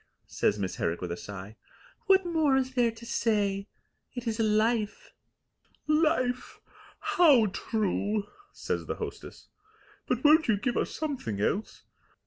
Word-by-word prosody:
says 105 - 0
Miss 95 -2 -3
Herrick 85 - -1
with 90 -2 -5
a - - -2
sigh. 100 +3 -9 0.5
"What 385 -1 +5
more 315 -5 +2
is 260 0 -1
there 245 -2 +3
to 225 +1 -10
say? 205 -4 0 0.5
It 245 0 -5
is 225 -1 -2
Life." 215 0 0 0.7
"Life! 305 -5 +1 0.4
How 350 - +5
true!" 210 -1 -1 0.3
says - - -4
the - - -2
hostess. - - -8 0.6
"But - - -1
won't 310 +2 +6
you 220 -3 +3
give 240 +4 -1
us - - 0
something 270 - -4
else? 195 - -2
230 Hz, 135 wpm, -28 LUFS, 200-290 Hz, 0.7 s, won't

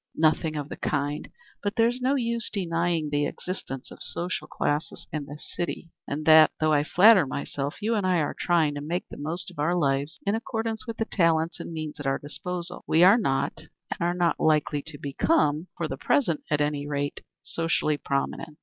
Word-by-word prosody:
"Nothing 155 0 +2
of 145 -2 -3
the - - -7
kind. 145 0 -2 0.3
But 205 0 -2
there's 235 +2 +2
no 265 +3 +2
use 235 -3 -1
denying 170 -5 -1
the 145 0 +1
existence 135 -8 -6
of - - -12
social 175 +2 -3
classes 145 +2 -2
in 150 -2 -3
this 145 +1 -9
city, 170 -1 -4 0.2
and 150 +2 -3
that, 155 0 +8
though 155 0 +3
I 145 -1 +3
flatter 190 +1 +6
myself 140 +5 -4
you 225 +2 +1
and 210 -3 +1
I 185 -1 +2
are 150 -3 0
trying 165 -4 +2
to 145 - -5
make 170 +5 -3
the - - -9
most 165 +5 -3
of 170 - -14
our 165 +4 +2
lives 145 0 0
in 200 - +2
accordance 225 0 -3
with 230 - -5
the 225 - 0
talents 165 -3 +1
and - - -6
means 155 -2 -5
at 145 - -4
our 135 - +2
disposal, 180 +3 -4
we 165 +2 +5
are 195 +6 +7
not 135 -11 0 0.3
and - - -3
are 175 +1 +1
not 175 -2 +1
likely 150 -1 +2
to 155 -3 -8
become, 150 - +1
for 165 - -1
the 135 - -5
present 170 - +1
at 150 -1 +1
any 145 -1 -1
rate, 145 -1 -2 0.2
socially 165 -2 0
prominent. 140 +2 -3
160 Hz, 200 wpm, -26 LUFS, 145-180 Hz, 0.3 s, that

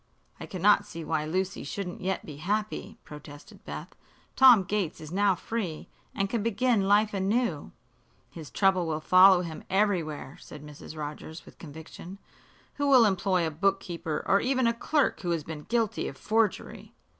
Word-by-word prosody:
"I - - -8
cannot 200 +2 +2
see 165 -5 -8
why 155 -2 -1
Lucy 185 +4 -2
shouldn't 190 -3 -6
yet 190 0 -2
be 150 -3 -9
happy," 210 +7 -3
protested 150 -1 -13
Beth. - - -7 0.5
"Tom 250 -7 +7
Gates 195 -3 -2
is 155 0 -10
now 195 +1 +2
free, 185 -5 -5 0.3
and 195 - 0
can 225 +2 -2
begin 225 -1 +1
life 210 +1 +3
anew." 195 -4 -1 0.6
"His 160 -4 -10
trouble 190 -3 +2
will 155 -1 -2
follow 185 +2 +6
him 165 -3 -7
everywhere," 180 -8 -1
said 150 0 -12
Mrs. 150 +1 -11
Rogers, 150 +2 -7
with - - -17
conviction. 165 +4 -10 0.6
"Who 285 0 0
will 260 -4 +6
employ 190 -3 +1
a 160 - -2
bookkeeper, 170 -1 -2
or 195 - +3
even 260 0 +1
a 230 - +3
clerk 290 +5 0
who 175 - -4
has 165 -3 -1
been 150 -1 -8
guilty 230 -2 0
of 135 - -8
forgery?" 220 +2 -2
190 Hz, 165 wpm, -27 LUFS, 160-210 Hz, 0.6 s, Tom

